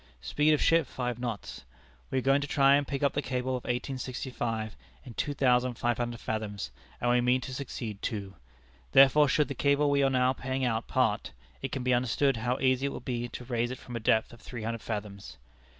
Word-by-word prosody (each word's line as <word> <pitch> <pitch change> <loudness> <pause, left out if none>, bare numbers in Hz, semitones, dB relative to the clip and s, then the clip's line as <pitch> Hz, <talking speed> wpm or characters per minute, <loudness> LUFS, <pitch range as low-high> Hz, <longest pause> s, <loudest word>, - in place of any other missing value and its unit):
Speed 150 - +2
of - - -3
ship 165 -3 +4
five 125 -2 -3
knots. 120 -4 -5 0.5
We - - -1
are - - +2
going 135 +2 +3
to 145 - -3
try 140 -1 +5
and 145 -1 +1
pick 140 0 -3
up 140 - +3
the 145 - 0
cable 130 -1 -2
of 125 -1 -3
1865 125 -3 -3 0.3
in 120 - -9
two 145 +5 -2
thousand 125 -2 +2
five 120 0 0
hundred 120 -1 -2
fathoms 105 - -3 0.3
(and 120 - +1
we 125 0 +4
mean 125 +1 +3
to 130 +1 -6
succeed 120 -6 -5
too); 100 -3 -4 0.6
therefore 140 +2 +7
should 150 +2 +3
the 140 - -4
cable 140 +2 +2
we 140 0 +3
are 135 - +4
now 130 0 +3
paying 130 0 -2
out 115 -2 -1
part, - - 0 0.3
it - - -4
can 130 - -3
be 125 0 +2
understood 125 +2 +2
how 120 +3 0
easy 130 +1 +2
it 140 - -4
would - - -8
be 120 -1 -2
to 125 +1 -8
raise 120 -1 -1
it 130 - -5
from 120 - -9
a - - -1
depth 110 +1 +2
of 120 - -14
three 120 -3 -7
hundred 115 0 -3
fathoms. 100 - -6
125 Hz, 220 wpm, -29 LUFS, 115-135 Hz, 0.6 s, therefore